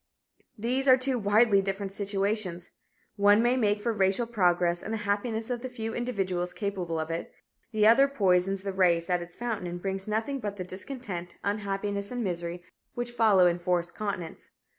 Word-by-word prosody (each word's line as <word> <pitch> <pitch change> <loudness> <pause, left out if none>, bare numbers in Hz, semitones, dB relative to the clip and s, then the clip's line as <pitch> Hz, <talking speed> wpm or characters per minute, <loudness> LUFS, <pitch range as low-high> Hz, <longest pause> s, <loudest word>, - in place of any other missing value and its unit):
These 250 +5 -1
are 255 -1 +8
two 260 -1 0
widely 205 0 +4
different 195 0 -3
situations 195 -2 -2 0.5
one 205 +1 +5
may 240 +1 +3
make 210 -4 +2
for 230 +2 -1
racial 195 +3 +2
progress 175 -6 +2
and 215 - -6
the 225 - -1
happiness 220 +3 -1
of 240 -1 -2
the 255 - -5
few 225 -3 -5
individuals 190 -7 -2
capable 185 -5 -3
of 160 +1 -3
it; 165 - -4 0.4
the 215 -2 +2
other 250 +6 +7
poisons 195 -6 +1
the 195 -1 -3
race 175 -2 +2
at 180 -1 +2
its 175 0 -9
fountain 230 -6 -3
and 175 0 -5
brings 195 +1 -3
nothing 225 +6 -1
but 205 -4 -4
the 185 - -5
discontent, 185 -2 -7
unhappiness 200 0 -2
and 245 -1 -3
misery 175 -2 -3 0.3
which 240 0 -3
follow 215 -6 +5
enforced 175 0 +1
continence. 195 -6 -5
200 Hz, 175 wpm, -28 LUFS, 180-225 Hz, 0.5 s, are